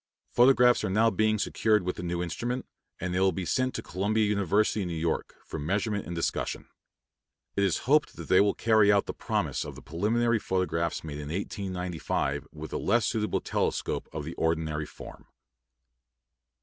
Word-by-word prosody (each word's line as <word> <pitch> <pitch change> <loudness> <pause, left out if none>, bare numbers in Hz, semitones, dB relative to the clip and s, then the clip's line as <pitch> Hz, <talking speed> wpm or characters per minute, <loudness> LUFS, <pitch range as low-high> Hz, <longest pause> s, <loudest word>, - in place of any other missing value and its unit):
Photographs 125 -1 +5
are 105 - 0
now 110 +4 +3
being 110 0 +2
secured 105 0 +2
with 90 +1 -2
the - - -6
new 85 0 -2
instrument, 120 +9 -3 0.3
and 90 0 -3
they 90 - +1
will 95 0 +4
be 95 -1 -4
sent 130 +7 0
to - - -4
Columbia 105 +4 0
University, 105 +1 +1
New 85 -2 -3
York, 80 0 -2
for - - -6
measurement 100 +6 -1
and 85 - -4
discussion. 85 - -2 0.9
It 100 - +2
is 95 -5 +2
hoped 150 +4 +3
that - - -8
they 95 +1 +6
will 100 0 +2
carry 110 -2 +4
out 100 -1 +3
the - - -4
promise - - -1
of - - -8
the - - -11
preliminary 110 +9 +1
photographs 90 -4 -1
made 75 -2 -6
in 75 -1 -6
1895 90 -6 -2
with 80 0 -8
a - - 0
less 115 +3 +2
suitable 110 -2 0
telescope - - -1
of 75 -2 -5
the 80 - -5
ordinary 80 -2 0
form. - - -12
95 Hz, 175 wpm, -28 LUFS, 85-110 Hz, 0.9 s, they